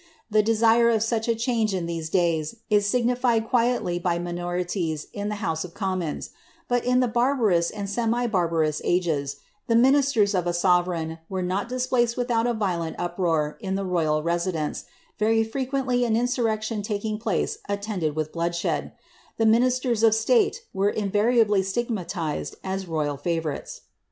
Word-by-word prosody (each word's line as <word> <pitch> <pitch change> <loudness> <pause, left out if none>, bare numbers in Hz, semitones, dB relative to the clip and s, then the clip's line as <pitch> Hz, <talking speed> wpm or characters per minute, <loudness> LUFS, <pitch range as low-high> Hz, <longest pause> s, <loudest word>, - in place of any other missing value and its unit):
The 215 0 +5
desire 225 +2 +4
of 220 -2 +2
such 225 -1 -1
change 225 -4 0
in 180 -2 -2
these 165 -1 -4
days, 165 -1 +1 0.2
is 205 -1 +4
signified 240 -1 +1
quietly 235 -8 +1
by 175 -1 0
minorities 175 -2 -3
in 205 0 -3
the 210 - -2
house 160 -1 -1
of 175 -2 -10
commons; 185 -6 -3 0.4
but 245 -1 +1
in 250 +1 +3
the 250 - +2
barbarous 230 -8 +2
and 205 -2 -5
semi 235 +3 0
barbarous 165 -7 0
ages, 160 -6 0 0.3
the 230 - +2
ministers 255 -4 +4
of 180 -2 0
a 175 - 0
sovereign 175 -2 +1
were 190 -1 -2
not 190 +5 -2
displaced 250 -2 0
without 240 -2 +1
a 240 - 0
violent 175 -6 -2
uproar 170 -4 -1
in 190 -4 -3
the 195 0 -2
royal 155 -4 +1
residence, 170 -2 -2 0.3
very 225 +1 +3
frequently 255 +1 -1
an 225 -2 +2
insurrection 225 -3 0
taking 210 +1 -3
place 220 -3 -1
attended 200 -7 -2
with 155 0 -2
bloodshed; 170 0 -2 0.4
the 225 - +2
ministers 245 +1 +2
of 225 -1 +5
state 445 - +2
were 195 +1 +2
invariably 210 0 +2
stigmatized 190 -6 -3
as 190 0 -3
royal 150 -3 -1
favourites. 160 -1 -3
205 Hz, 150 wpm, -25 LUFS, 175-230 Hz, 0.4 s, The